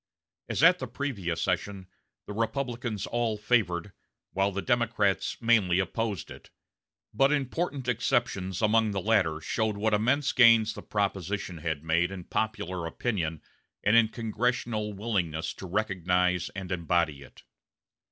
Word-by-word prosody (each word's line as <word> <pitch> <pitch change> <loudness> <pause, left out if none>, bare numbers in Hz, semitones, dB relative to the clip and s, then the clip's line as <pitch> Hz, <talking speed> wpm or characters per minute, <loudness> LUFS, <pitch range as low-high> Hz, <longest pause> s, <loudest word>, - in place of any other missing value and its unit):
As - - 0
at 180 +2 +7
the - - -4
previous 100 - -3
session, 100 -2 -2 0.4
the 105 - -7
Republicans 115 -1 -2
all 120 -2 -1
favored, 105 -5 +1 0.4
while 95 +1 +1
the 100 0 -4
Democrats 115 -5 +1
mainly 110 -7 +3
opposed 100 +2 -2
it; - - -12 0.6
but 135 +6 +3
important 145 -1 -1
exceptions 115 -6 0
among 110 +1 +3
the 100 - -1
latter 95 -7 +2
showed 110 +5 -1
what 110 +1 +1
immense 130 +6 +2
gains 115 -3 +6
the 105 - -8
proposition 100 -3 -2
had 80 -2 -3
made 80 +2 +2
in 95 -2 -7
popular 95 -5 -2
opinion 80 -6 -2 0.4
and 105 +2 +4
in 115 -1 +6
congressional 115 -1 -2
willingness 95 -7 -2
to 95 - -9
recognize 90 -2 0
and 95 -2 -6
embody 85 -4 0
it. 70 - -15
105 Hz, 135 wpm, -28 LUFS, 90-115 Hz, 0.6 s, at